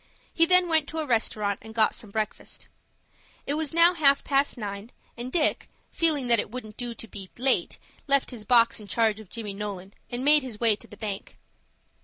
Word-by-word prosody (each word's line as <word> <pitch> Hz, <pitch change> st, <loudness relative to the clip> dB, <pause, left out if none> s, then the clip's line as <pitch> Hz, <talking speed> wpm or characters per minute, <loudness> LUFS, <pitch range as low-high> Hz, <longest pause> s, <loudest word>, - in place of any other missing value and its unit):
He 330 Hz, 0 st, +5 dB
then 365 Hz, 0 st, +5 dB
went 320 Hz, -3 st, +1 dB
to 320 Hz, -, -7 dB
a 315 Hz, -, -1 dB
restaurant, 215 Hz, -5 st, 0 dB
and 220 Hz, 0 st, -12 dB
got 220 Hz, -2 st, +3 dB
some 215 Hz, -, -6 dB
breakfast. 215 Hz, +1 st, -5 dB, 0.8 s
It 285 Hz, -, -1 dB
was 305 Hz, -1 st, -1 dB
now 335 Hz, +2 st, +5 dB
half 280 Hz, -5 st, +3 dB
past 275 Hz, -1 st, +1 dB
nine, 205 Hz, +1 st, -6 dB, 0.2 s
and 240 Hz, +2 st, -6 dB
Dick, 315 Hz, -1 st, +1 dB, 0.2 s
feeling 310 Hz, -5 st, +2 dB
that 235 Hz, -2 st, +4 dB
it -, -, -2 dB
wouldn't 220 Hz, -3 st, -8 dB
do 240 Hz, -1 st, -5 dB
to 225 Hz, -, -6 dB
be 195 Hz, -3 st, -9 dB
late, 260 Hz, +2 st, +1 dB, 0.3 s
left 280 Hz, -1 st, +2 dB
his 235 Hz, -4 st, -8 dB
box 235 Hz, -1 st, +3 dB
in 210 Hz, -, -12 dB
charge 220 Hz, -1 st, +1 dB
of 215 Hz, -4 st, -13 dB
Johnny 215 Hz, -4 st, -5 dB
Nolan, 195 Hz, -1 st, -6 dB, 0.2 s
and 245 Hz, +2 st, -4 dB
made 300 Hz, +1 st, +6 dB
his 245 Hz, -5 st, -8 dB
way 230 Hz, -3 st, +4 dB
to -, -, -11 dB
the 210 Hz, -, -14 dB
bank. 205 Hz, -2 st, -6 dB
235 Hz, 205 wpm, -26 LUFS, 210-285 Hz, 0.8 s, made